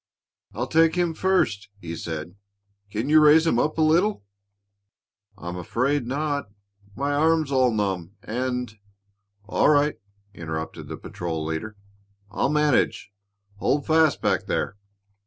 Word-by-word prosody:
"I'll 120 +4 -1
take 165 +3 +3
him 175 -2 +1
first," 160 - 0
he 85 -3 -6
said. 80 +1 -6 0.6
"Can 110 +5 -3
you 155 +1 +6
raise 155 +2 +6
him 120 -8 +2
up 155 +5 0
a 160 - +3
little?" 170 - +2 1.1
"I'm 85 -2 -6
afraid 125 +8 -1
not. 145 -2 -2 0.5
My 140 +3 -1
arm's 155 0 +2
all 130 -2 +3
numb, 95 -4 -2
and 125 -2 -3 0.3
" - - -48 0.3
"All 105 - +2
right," 150 0 +3 0.3
interrupted 80 -2 -6
the - - -6
patrol 80 -3 -5
leader. 80 +7 -4 0.5
"I'll 120 - 0
manage. 150 -7 +1 0.5
Hold 140 +7 0
fast 160 -3 +3
back - - +1
there." - - -1
130 Hz, 135 wpm, -24 LUFS, 100-155 Hz, 1.1 s, you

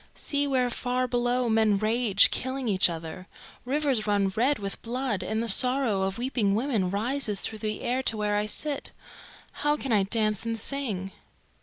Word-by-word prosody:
"See 285 -1 0
where 255 -3 0
far 250 +1 -2
below 245 0 0
men 220 -2 +2
rage, 215 -1 +3
killing 260 0 -3
each 190 -4 +4
other. 165 +2 -7 0.4
Rivers 265 -5 0
run 200 -2 +1
red 265 +6 +2
with 200 -1 -6
blood, 240 -4 -3
and 220 +5 -2
the - - -4
sorrow 250 -2 +4
of 190 +1 -2
weeping 235 -5 0
women 225 -6 0
rises 215 +1 -1
through 220 - -5
the 215 0 -3
air 250 +2 -1
to 225 -4 0
where 210 -1 -1
I 210 +1 0
sit. 285 +6 -1 0.7
How 295 0 +1
can 270 -3 -5
I 205 - +4
dance 215 0 +1
and 230 0 -3
sing?" 220 -6 -2
225 Hz, 175 wpm, -26 LUFS, 205-255 Hz, 0.7 s, each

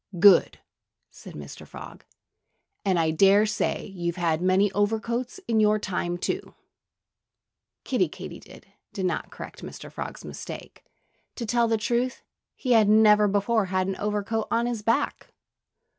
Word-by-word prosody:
"Good!" 185 0 +6 0.5
said - - -12
Mr. 70 -1 -10
Frog. - - -11 0.8
"And 190 -2 +2
I 160 -1 +2
dare 195 +5 +5
say 220 +1 -1
you've 175 -4 -4
had 170 -2 0
many 185 +2 +3
overcoats 225 - -1
in 225 -2 +2
your 215 0 +4
time, 180 -4 -2
too." - - -4 1.3
Kiddie - - +1
Katydid - - -11 0.3
did 190 -3 -2
not 180 - -2
correct - - -10
Mr. - - -9
Frog's - - -7
mistake. - - -9 0.5
To 235 - -4
tell 235 +1 +2
the 225 0 +1
truth, 240 +3 -1 0.3
he 255 - -3
had 220 -3 +5
never 210 -1 +6
before 205 +2 +1
had 185 0 0
an 195 0 -2
overcoat 210 +1 -2
on 235 +1 +1
his 240 -3 -2
back. 230 +2 -1
210 Hz, 145 wpm, -26 LUFS, 185-225 Hz, 1.3 s, Good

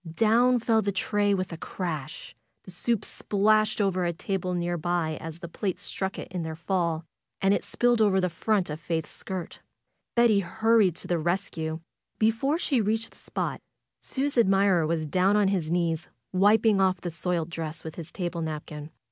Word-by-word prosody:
Down 230 +7 +4
fell 225 -1 +2
the 200 -1 0
tray 205 +1 +1
with 185 -2 -3
a - - -6
crash 155 -8 -5 0.3
The 185 - -11
soup 225 +4 -1
splashed 215 +1 +2
over 190 -3 +1
a 175 - +1
table 180 +1 -2
near 175 0 -1
by 170 -1 -1
as 160 0 -7
the 170 - -8
plates 185 +2 -3
struck 190 -1 -3
it - - -6
in 180 -1 -3
their 160 -1 -4
fall, 170 -1 -1 0.3
and 195 0 +3
it - - 0
spilled 240 -2 +2
over 200 -3 +4
the 180 - +2
front 185 +1 0
of 150 - -5
Faith's 165 -1 -3
skirt. 185 -3 -6 0.6
Betty 235 -4 +5
hurried 205 0 +3
to - - -6
the 175 -1 +1
rescue. 165 -2 -2 0.4
Before 225 +8 +2
she 275 -8 +1
reached 220 +2 -1
the - - -20
spot, - - -3 0.4
Sue's 275 -1 -1
admirer 195 -5 +4
was 160 -1 0
down 185 +6 +2
on 205 -2 +3
his 180 -6 -1
knees 170 -1 0 0.3
wiping 205 +2 +4
off 185 -1 +2
the 175 - -4
soiled 170 +1 -2
dress 160 -1 -5
with 160 - -6
his 170 -1 -8
table 175 -2 -3
napkin. 150 -1 -5
185 Hz, 180 wpm, -27 LUFS, 165-210 Hz, 0.6 s, Betty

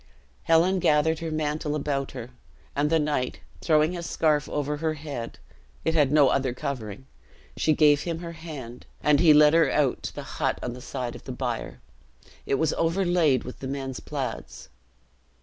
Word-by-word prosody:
Helen 175 +4 +4
gathered 155 0 +2
her 165 -1 -4
mantle 150 -1 -2
about 140 -2 -2
her; 125 -1 -7 0.4
and 145 +1 +1
the 165 - +3
knight, 145 -5 -1 0.2
throwing 155 0 +3
his 170 -1 -5
scarf 150 -2 +1
over 150 0 -2
her 160 +1 -1
head 140 -6 -6 0.5
it 160 - +2
had 145 -4 +3
no 150 -2 +5
other 130 -2 0
covering 125 -3 -5 0.5
she 155 - +2
gave 145 -1 +4
him 170 0 -3
her 170 0 -7
hand, 150 -8 -9 0.2
and 150 -1 +4
he 165 -2 +6
led 150 0 +7
her 165 0 +4
out 140 -4 +1
on - - -17
the - - -6
hut - - -2
to - - -2
the 125 +1 -7
side 125 -1 -4
of - - -12
the 130 - -5
bier. 125 -2 -4 0.7
It - - +2
was 155 +2 +1
overlaid 165 -5 +2
with 125 - -9
the 135 - -5
men's 135 -1 -4
plaids. - - -6
150 Hz, 180 wpm, -26 LUFS, 135-160 Hz, 0.7 s, led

